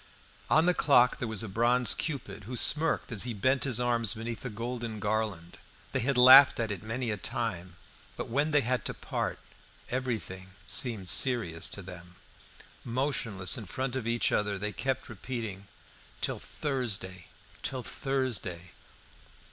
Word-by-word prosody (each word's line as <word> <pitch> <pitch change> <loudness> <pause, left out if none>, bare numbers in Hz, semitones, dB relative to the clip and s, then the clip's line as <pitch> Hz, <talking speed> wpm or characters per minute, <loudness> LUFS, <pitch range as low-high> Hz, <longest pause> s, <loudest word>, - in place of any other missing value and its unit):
On 160 - +5
the 180 - +4
clock 125 -7 +4
there 125 - -2
was 110 -2 -1
a - - -5
bronze 120 +4 +3
cupid, 140 -9 -4
who 125 +4 -6
smirked 155 +4 +4
as 110 -4 -1
he 120 -2 -3
bent 130 +7 +1
his 125 -4 +1
arm 120 -1 +1
beneath 115 +2 -5
a 130 - -4
golden 115 0 -5
garland. 105 -4 -2 0.3
They 130 - 0
had 130 +2 0
laughed 130 +2 +9
at 115 -2 -1
it 105 - -5
many 115 +2 -3
a 105 - -2
time, 95 -7 -4 0.4
but - - -4
when 145 +6 0
they 150 -1 +3
had 130 0 -1
to - - -3
part - - -3 0.5
everything 110 -7 -4
seemed 110 -7 0
serious 115 -9 +1
to 100 - -5
them. 90 -1 -11 0.7
Motionless 115 -6 -1
in 110 - -8
front 130 +7 -3
of 125 -4 -3
each 115 0 +1
other, 105 -1 0
they 105 +2 -3
kept 135 0 -2
repeating, 110 -4 -6 0.5
"Till - - -1
Thursday, 110 - -3 0.3
till 130 -2 -3
Thursday." 115 - -3
115 Hz, 155 wpm, -29 LUFS, 100-130 Hz, 0.7 s, laughed